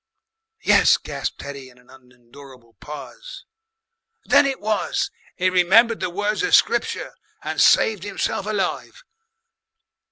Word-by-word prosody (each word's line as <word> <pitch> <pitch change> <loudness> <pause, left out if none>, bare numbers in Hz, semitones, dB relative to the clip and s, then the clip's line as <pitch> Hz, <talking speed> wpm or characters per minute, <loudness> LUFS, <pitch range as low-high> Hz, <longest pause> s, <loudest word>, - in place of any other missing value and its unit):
"Yes," - - +5
gasped - - -6
Teddy 140 -2 -9
in 125 - -21
an 125 0 -22
unendurable 125 -1 -17
pause. - - -10 0.8
"Then 280 - +4
it 270 -1 -3
was 215 0 -2 0.2
he 185 0 0
remembered 215 +6 +4
the 185 - -2
words 205 +4 -2
of 405 - +4
Scripture - - 0 0.3
and - - -2
saved 215 -5 +4
himself 205 0 -3
alive. 215 - -3
185 Hz, 120 wpm, -21 LUFS, 135-215 Hz, 0.8 s, Yes